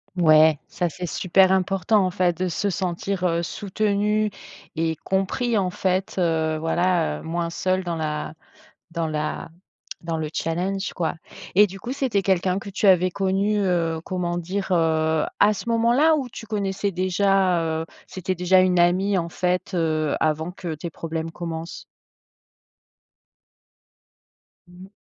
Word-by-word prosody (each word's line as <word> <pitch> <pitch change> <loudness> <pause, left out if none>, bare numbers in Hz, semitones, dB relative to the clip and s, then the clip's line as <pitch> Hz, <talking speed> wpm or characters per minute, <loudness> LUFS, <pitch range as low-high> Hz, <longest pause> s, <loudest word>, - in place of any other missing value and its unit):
Ouais, 155 -3 +5
ça 175 -1 -2
c'est 180 +2 -6
super 185 +3 +3
important, 190 +2 +2
en 185 - -1
fait, 180 -1 +1
de 185 - -1
se 200 +4 -1
sentir, 185 0 -2
heu, 170 -1 +1
soutenu 210 +3 0 0.5
et 160 0 0
compris 195 - -1
en 185 -2 0
fait, 185 +1 -1
heu, 160 -2 +1
voilà, 165 - +1
heu, - - -13
moins 170 +1 -2
seul 185 +2 -1
dans 175 -2 -3
la 155 -1 -3 0.6
dans 165 -1 -1
la 155 +1 -3 0.5
dans 165 -1 -2
le 155 -1 -3
challenge 185 +5 -2
quoi 170 -2 -2 0.4
et 210 - +8
du 195 0 -10
coup, 240 - -6
c'était 260 -7 0
quelqu'un 185 0 +1
que 200 - -8
tu 200 +2 0
avais 185 -1 +5
connu, 195 +3 0
heu, 170 -4 0
comment 175 -2 -2
dire? 190 +3 -3
Heu, 160 -2 +2 0.2
à 210 - +6
ce 225 +3 -6
moment-là 235 +8 +4
ou 275 -5 -2
tu 225 - -10
connaissais 200 -2 -2
déjà, 185 0 +2 0.2
heu, - - -3 0.2
c'était 185 0 -4
déjà 180 +1 +4
une 185 -1 +3
amie 185 +3 +3
en 170 - -2
fait, 180 +2 -1
heu, 155 -3 0
avant 160 +2 0
que 175 -3 -5
tes 165 +3 -6
problèmes 165 0 -5
commencent? 165 -1 -6 2.9
Mmh 180 +1 -13
mh. 190 - -13
180 Hz, 155 wpm, -23 LUFS, 165-195 Hz, 2.9 s, et